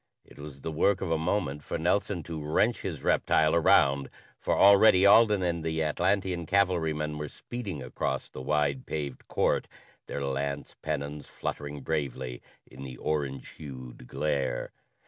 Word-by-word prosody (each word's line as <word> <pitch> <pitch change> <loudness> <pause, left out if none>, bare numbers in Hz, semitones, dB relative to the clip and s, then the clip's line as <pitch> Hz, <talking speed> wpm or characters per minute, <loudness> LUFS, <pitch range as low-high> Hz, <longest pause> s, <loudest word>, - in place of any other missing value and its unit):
It - - -17
was 70 -2 -9
the 80 - -4
work 95 +5 +2
of 90 - -2
a 80 - +2
moment 80 -4 -1
for - - -4
Nelson 90 +1 0
to 80 -1 -6
wrench 105 +10 +1
his 80 -8 -5
reptile 80 -1 +3
around, 70 -4 +4 0.3
for - - 0
already 100 -1 +7
Alden 105 -1 +6
and 85 -2 -1
the 80 0 -1
Atlantean 90 +2 0
cavalrymen 80 -6 +1
were 75 - -3
speeding 100 - -6
across 65 - -3
the - - -9
wide 70 -1 0
paved 70 -4 -5
court, - - +1 0.4
their 70 - -3
lance 70 +1 -3
pennons 75 -1 -4
fluttering 75 -1 -5
bravely 65 -5 -3 0.2
in 65 - -13
the 65 -2 -8
orange 70 -4 -2
hued 65 -4 -10
glare. 70 -3 -1
75 Hz, 150 wpm, -28 LUFS, 70-85 Hz, 0.4 s, already